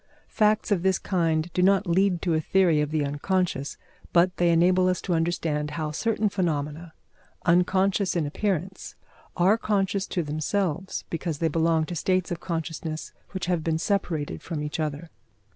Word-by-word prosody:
Facts 215 Hz, -1 st, +2 dB
of 190 Hz, -4 st, +2 dB
this 190 Hz, 0 st, +2 dB
kind 165 Hz, -2 st, 0 dB
do 180 Hz, -, +1 dB
not 195 Hz, +2 st, +4 dB
lead 180 Hz, 0 st, +2 dB
to 175 Hz, -, +1 dB
a 155 Hz, -, +1 dB
theory 170 Hz, -3 st, +3 dB
of 150 Hz, -, -1 dB
the 155 Hz, -1 st, 0 dB
unconscious, 145 Hz, 0 st, -1 dB, 0.3 s
but 180 Hz, +1 st, +3 dB
they 175 Hz, -1 st, +3 dB
enable 180 Hz, +2 st, +4 dB
us 180 Hz, -1 st, +1 dB
to 180 Hz, -, -1 dB
understand 165 Hz, -3 st, 0 dB
how 155 Hz, -2 st, -2 dB
certain 215 Hz, +6 st, 0 dB
phenomena, 160 Hz, -4 st, -2 dB, 0.5 s
unconscious 185 Hz, +3 st, +2 dB
in 165 Hz, -3 st, +1 dB
appearance, 190 Hz, +3 st, -3 dB, 0.4 s
are 190 Hz, +5 st, +4 dB
conscious 195 Hz, -2 st, 0 dB
to 175 Hz, -, -1 dB
themselves, 170 Hz, +4 st, -2 dB
because 165 Hz, -2 st, -3 dB
they 165 Hz, +1 st, +1 dB
belong 160 Hz, 0 st, +2 dB
to 175 Hz, -, -6 dB
states 185 Hz, +2 st, 0 dB
of 170 Hz, -, -3 dB
consciousness 165 Hz, -2 st, -4 dB, 0.2 s
which 190 Hz, -2 st, -4 dB
have 175 Hz, -3 st, 0 dB
been 160 Hz, -1 st, 0 dB
separated 165 Hz, -5 st, -2 dB
from 155 Hz, -4 st, -4 dB
each 150 Hz, +3 st, -4 dB
other. 155 Hz, +1 st, -3 dB
175 Hz, 165 wpm, -26 LUFS, 160-190 Hz, 0.5 s, not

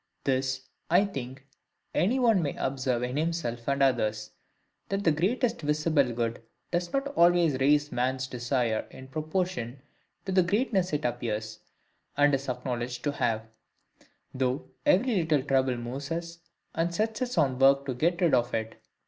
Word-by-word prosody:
This, 130 Hz, -1 st, 0 dB, 0.3 s
I 180 Hz, +5 st, +5 dB
think, 135 Hz, -7 st, -7 dB, 0.5 s
any 225 Hz, +9 st, +2 dB
one 230 Hz, -7 st, +4 dB
may 145 Hz, -4 st, -2 dB
observe 130 Hz, -2 st, -1 dB
in 125 Hz, +3 st, -2 dB
himself 155 Hz, -8 st, -2 dB
and 140 Hz, 0 st, +2 dB
others,—That 115 Hz, -, -3 dB
the 165 Hz, -, +4 dB
greater 195 Hz, -, +1 dB
visible 150 Hz, -, +1 dB
good 115 Hz, -1 st, -2 dB, 0.3 s
does 175 Hz, 0 st, -1 dB
not 275 Hz, +1 st, -1 dB
always 170 Hz, -, +4 dB
raise 145 Hz, +2 st, +3 dB
men's 130 Hz, +1 st, 0 dB
desires 120 Hz, -2 st, -1 dB
in 130 Hz, 0 st, -12 dB
proportion 155 Hz, -4 st, -3 dB, 0.4 s
to 190 Hz, -, -3 dB
the 185 Hz, 0 st, +5 dB
greatness 195 Hz, 0 st, +1 dB
it 150 Hz, -2 st, -1 dB
appears, 110 Hz, -3 st, -3 dB, 0.6 s
and 145 Hz, 0 st, +4 dB
is 135 Hz, 0 st, -1 dB
acknowledged, 125 Hz, -1 st, -3 dB
to 145 Hz, -, +1 dB
have: 115 Hz, -5 st, 0 dB, 0.9 s
though 130 Hz, +1 st, -2 dB, 0.2 s
every 255 Hz, -6 st, +4 dB
little 160 Hz, -5 st, +2 dB
trouble 130 Hz, -2 st, +1 dB
moves 130 Hz, +4 st, -5 dB
us, 170 Hz, 0 st, -4 dB, 0.3 s
and 170 Hz, +1 st, -1 dB
sets 220 Hz, +3 st, -1 dB
us 250 Hz, -5 st, -2 dB
on 135 Hz, -5 st, +2 dB
work 140 Hz, +1 st, +5 dB
to 135 Hz, -, -2 dB
get 170 Hz, +8 st, 0 dB
rid 170 Hz, -3 st, +3 dB
of 120 Hz, -1 st, +2 dB
it. 110 Hz, 0 st, -4 dB
140 Hz, 155 wpm, -28 LUFS, 125-170 Hz, 0.9 s, I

